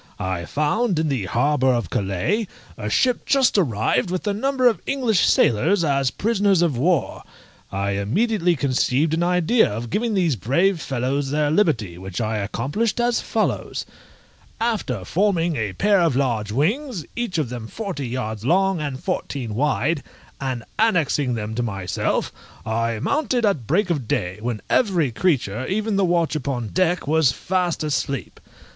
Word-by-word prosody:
I 95 Hz, -2 st, -3 dB
found, 165 Hz, -, 0 dB
in 160 Hz, -1 st, +1 dB
the 130 Hz, -8 st, -1 dB
harbour 130 Hz, +6 st, +2 dB
of 120 Hz, -8 st, -1 dB
Calais, 100 Hz, -, 0 dB, 0.3 s
a 105 Hz, -1 st, -4 dB
ship 250 Hz, -, +2 dB
just 270 Hz, -2 st, +3 dB
arrived 125 Hz, -, +1 dB
with 185 Hz, +2 st, -3 dB
a 205 Hz, -, +1 dB
number 260 Hz, +4 st, 0 dB
of 235 Hz, -, +2 dB
English 245 Hz, -8 st, +1 dB
sailors 165 Hz, -, +3 dB
as 140 Hz, -3 st, +2 dB
prisoners 200 Hz, -, +2 dB
of 160 Hz, -6 st, +1 dB
war. 160 Hz, +5 st, 0 dB, 0.5 s
I 100 Hz, +1 st, -1 dB
immediately 175 Hz, -, +1 dB
conceived 140 Hz, +2 st, +1 dB
an 165 Hz, -, +1 dB
idea 180 Hz, +6 st, +3 dB
of 115 Hz, +3 st, -5 dB
giving 225 Hz, -, 0 dB
these 170 Hz, -7 st, +2 dB
brave 160 Hz, -, +1 dB
fellows 135 Hz, +2 st, -1 dB
their 150 Hz, +1 st, +1 dB
liberty, 125 Hz, -, +1 dB
which 95 Hz, -1 st, -6 dB
I 110 Hz, -1 st, -1 dB
accomplished 140 Hz, -, -2 dB
as 240 Hz, 0 st, +1 dB
follows: -, -, -2 dB, 0.7 s
After 205 Hz, -, -1 dB
forming 175 Hz, -, +1 dB
a 105 Hz, -6 st, -2 dB
pair 200 Hz, -, +3 dB
of 165 Hz, -6 st, +2 dB
large 115 Hz, -6 st, 0 dB
wings, 200 Hz, -, -1 dB
each 235 Hz, -7 st, -2 dB
of 150 Hz, -7 st, -1 dB
them 120 Hz, -2 st, -6 dB
forty 180 Hz, -, -5 dB
yards 110 Hz, -4 st, -4 dB
long, 190 Hz, +4 st, +2 dB
and 140 Hz, -3 st, -4 dB
fourteen 125 Hz, -6 st, -3 dB
wide, 145 Hz, +4 st, 0 dB, 0.4 s
and 130 Hz, -3 st, -3 dB, 0.2 s
annexing 160 Hz, -, +2 dB
them 110 Hz, -1 st, -4 dB
to 120 Hz, -, -1 dB
myself, 100 Hz, -6 st, -2 dB, 0.3 s
I 115 Hz, 0 st, -1 dB
mounted 255 Hz, -, 0 dB
at 155 Hz, -, 0 dB
break 185 Hz, +4 st, +2 dB
of 140 Hz, -9 st, -2 dB
day, 90 Hz, 0 st, -2 dB
when 115 Hz, -2 st, -3 dB
every 180 Hz, -, +2 dB
creature, 125 Hz, -, 0 dB
even 215 Hz, +2 st, -1 dB
the 195 Hz, -, +2 dB
watch 170 Hz, -3 st, +1 dB
upon 130 Hz, -6 st, -3 dB
deck, 180 Hz, -, +1 dB
was 155 Hz, -2 st, +3 dB
fast 180 Hz, +1 st, -1 dB
asleep. 140 Hz, -2 st, -2 dB
150 Hz, 160 wpm, -22 LUFS, 120-195 Hz, 0.7 s, just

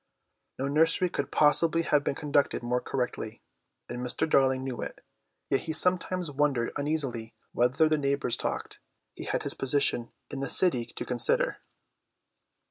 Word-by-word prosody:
No 135 Hz, -, -2 dB
nursery 165 Hz, +5 st, +3 dB
could -, -, -3 dB
possibly 165 Hz, +2 st, +4 dB
have 150 Hz, -3 st, +1 dB
been 140 Hz, -, -2 dB
conducted 145 Hz, -3 st, 0 dB
more 125 Hz, +1 st, -1 dB
correctly, 125 Hz, -2 st, -4 dB, 0.5 s
and 120 Hz, -, -6 dB
Mr. 125 Hz, +5 st, -2 dB
Darling 130 Hz, -3 st, +2 dB
knew 130 Hz, -2 st, -5 dB
it, -, -, -7 dB, 0.5 s
yet 135 Hz, -, +3 dB
he 160 Hz, -, -5 dB
sometimes 180 Hz, 0 st, 0 dB
wondered 135 Hz, -4 st, 0 dB
uneasily 140 Hz, -7 st, -3 dB, 0.2 s
whether 125 Hz, +6 st, +2 dB
the 155 Hz, -1 st, +1 dB
neighbours 140 Hz, -3 st, 0 dB
talked. -, -, -4 dB, 0.4 s
He -, -, -8 dB
had -, -, -2 dB
his -, -, +4 dB
position 135 Hz, -3 st, 0 dB, 0.2 s
in 140 Hz, -, -5 dB
the 135 Hz, -1 st, -3 dB
city 150 Hz, -11 st, +3 dB
to -, -, -8 dB
consider. 120 Hz, -2 st, +1 dB
140 Hz, 150 wpm, -28 LUFS, 125-155 Hz, 0.5 s, possibly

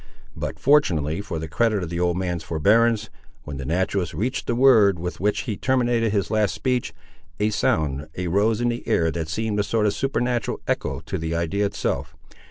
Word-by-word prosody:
But, -, -, -4 dB
fortunately 85 Hz, -, +2 dB
for 100 Hz, -, -5 dB
the 80 Hz, 0 st, -4 dB
credit 105 Hz, +3 st, +1 dB
of 85 Hz, -, -6 dB
the 85 Hz, -, -2 dB
old 90 Hz, 0 st, +1 dB
man's 90 Hz, -2 st, -2 dB
forbearance, 110 Hz, +8 st, +2 dB, 0.3 s
when 75 Hz, -1 st, -7 dB
the 65 Hz, -, -5 dB
naturalist 90 Hz, +1 st, -1 dB
reached 120 Hz, -, -2 dB
the 120 Hz, -, 0 dB
word, 115 Hz, -7 st, +5 dB
with 90 Hz, +1 st, -5 dB
which 105 Hz, +2 st, +1 dB
he 110 Hz, -, -3 dB
terminated 120 Hz, -2 st, +1 dB
his 100 Hz, -5 st, -1 dB
last 110 Hz, -2 st, +1 dB
speech, 125 Hz, -2 st, -1 dB, 0.5 s
a 105 Hz, +1 st, +1 dB
sound 75 Hz, -7 st, 0 dB
arose 100 Hz, +6 st, +1 dB
in 120 Hz, -, +2 dB
the 120 Hz, 0 st, -3 dB
air 80 Hz, -1 st, +2 dB
that 80 Hz, -1 st, -4 dB
seemed 105 Hz, +4 st, -1 dB
a -, -, +3 dB
sort 110 Hz, +1 st, 0 dB
of 105 Hz, -, +2 dB
supernatural 125 Hz, -3 st, -1 dB
echo 70 Hz, +3 st, -1 dB
to 95 Hz, +3 st, -4 dB
the 80 Hz, +1 st, -2 dB
idea 95 Hz, +5 st, 0 dB
itself. 100 Hz, -, -3 dB
100 Hz, 190 wpm, -23 LUFS, 85-115 Hz, 0.5 s, word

